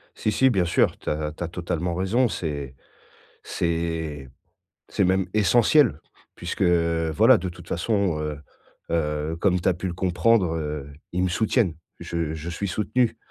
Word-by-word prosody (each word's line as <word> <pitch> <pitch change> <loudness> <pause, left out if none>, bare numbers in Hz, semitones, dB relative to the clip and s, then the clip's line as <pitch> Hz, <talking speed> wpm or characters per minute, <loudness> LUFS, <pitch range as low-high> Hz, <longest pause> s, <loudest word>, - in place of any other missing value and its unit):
Si, 110 - -1
si, 130 +5 +4
bien 95 -7 +2
sûr, 85 - +2
tu - - -6
as 75 0 -2
tu 80 - -6
as 85 - -2
totalement 85 0 -3
raison, 100 +8 +2
c'est 70 - -4 0.7
c'est 80 -4 -2 0.6
c'est - - +1
même 95 +1 +2
essentiel 110 - +4 0.4
puisque - - -3
voilà, 85 +6 +4
de 90 0 -4
toute 85 0 -13
façon, 95 -3 0
heu 75 -1 -3 0.5
heu, 75 -1 -1
comme 90 -1 +2
tu - - +2
as 90 - +2
pu 90 +2 -4
le 85 - -3
comprendre, 95 0 +2
heu, 75 -3 -4 0.2
ils 90 +1 0
me 90 - +1
soutiennent. 105 -1 +1 0.2
Je 85 -2 -3
je 80 +2 -6
suis 95 +4 -3
soutenu 115 +4 0
85 Hz, 160 wpm, -24 LUFS, 80-100 Hz, 0.7 s, si